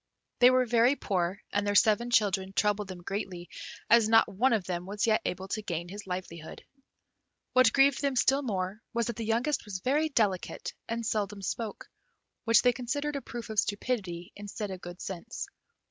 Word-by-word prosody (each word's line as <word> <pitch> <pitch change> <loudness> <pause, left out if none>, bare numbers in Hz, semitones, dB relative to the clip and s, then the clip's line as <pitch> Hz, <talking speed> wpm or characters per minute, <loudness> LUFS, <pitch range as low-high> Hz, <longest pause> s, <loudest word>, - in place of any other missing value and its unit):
They 245 - +8
were 255 0 +3
very 240 +3 +4
poor, 185 -5 -2
and 205 0 0
their 205 - 0
seven 220 +4 +4
children 195 -4 +2
troubled 210 0 +1
them 180 -2 -9
greatly, 185 -2 -5 0.4
as 230 -1 +5
not 225 0 +6
one 240 +8 +1
of 220 -4 +2
them 180 0 -4
was 205 +3 -1
yet 220 -1 +3
able 185 +1 -3
to 215 - -2
gain 175 -4 -4
his 200 +1 -8
livelihood. 180 -3 -6 0.9
What 255 -3 +6
grieved 275 0 +4
them 280 -2 0
still 270 +3 +3
more 200 -4 -3
was 235 0 +1
that 235 - -3
the 230 - -4
youngest 240 +6 0
was 205 -3 -5
very 290 +10 +1
delicate, 205 -9 -1 0.2
and 230 0 -2
seldom 205 -2 -2
spoke, 220 +2 -4 0.6
which 230 -1 +5
they 245 -1 +5
considered 285 +4 -3
a 280 - -3
proof 240 -4 -7
of 215 - +1
stupidity 200 -6 -2
instead 205 0 -6
of 185 -1 -7
good 175 +1 -9
sense. 195 +5 -5
210 Hz, 185 wpm, -29 LUFS, 190-240 Hz, 0.9 s, They